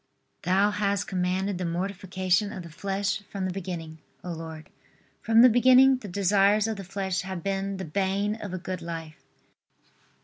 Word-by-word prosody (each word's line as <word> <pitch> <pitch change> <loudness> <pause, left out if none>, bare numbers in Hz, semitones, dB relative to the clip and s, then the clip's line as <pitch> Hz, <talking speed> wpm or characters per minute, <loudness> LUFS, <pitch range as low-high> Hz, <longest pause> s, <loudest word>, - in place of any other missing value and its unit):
Thou 195 +3 +3
hast 200 -1 0
commanded 185 +1 -1
the - - -2
mortification 185 +2 -1
of 190 -5 -7
the 170 - -11
flesh 195 +3 -2
from 195 -2 -3
the 185 - -1
beginning, 170 -4 -6 0.2
O 180 - -5
Lord. 160 -1 -8 0.5
From 225 +1 +5
the - - +10
beginning, 255 +2 +6
the 225 - -9
desires 200 +2 +3
of 220 -2 -3
the 195 - -6
flesh 190 0 -2
have 185 -3 -6
been 195 0 -2
the 190 - -5
bane 195 +5 0
of 210 -3 -7
a 185 - -3
good 185 0 -5
life. 165 -2 -7
195 Hz, 170 wpm, -27 LUFS, 180-205 Hz, 0.5 s, the